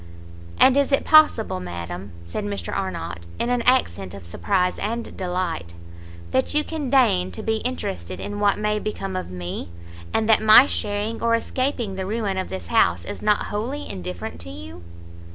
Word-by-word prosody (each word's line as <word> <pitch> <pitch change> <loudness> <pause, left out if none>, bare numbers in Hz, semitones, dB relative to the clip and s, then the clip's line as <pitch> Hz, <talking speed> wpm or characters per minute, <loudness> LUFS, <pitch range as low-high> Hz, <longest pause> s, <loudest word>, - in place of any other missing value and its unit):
"And 260 - +7
is 280 0 +2
it 275 - +2
possible, 305 - +5
madam," 90 +2 -6
said 85 - -4
Mr 100 -4 -4
Arnott, 85 +1 -4
in 240 - -1
an 245 -1 +1
accent 95 - +2
of 100 - -10
surprize 180 - 0
and 230 +2 -3
delight, 180 - -3 0.6
"that 130 - +1
you 300 - +3
can 305 -5 -4
deign 245 - +4
to - - -5
be 220 0 +1
interested 95 - -4
in 205 0 -5
what 205 -1 +3
may 210 0 0
become 195 -3 -4
of 185 - -3
me! 90 -1 -5 0.4
and 220 - +1
that 220 - +5
my 220 +4 +9
sharing 210 -2 -2
or 230 0 +3
escaping 235 -4 -2
the 190 -1 -3
ruin 205 -3 -1
of 185 - -4
this 95 -2 -5
house 85 0 +2
is - - -6
not 210 0 +2
wholly 250 +8 -3
indifferent 90 -2 -6
to 90 - -7
you?" 90 -2 -9
195 Hz, 175 wpm, -23 LUFS, -, 0.6 s, my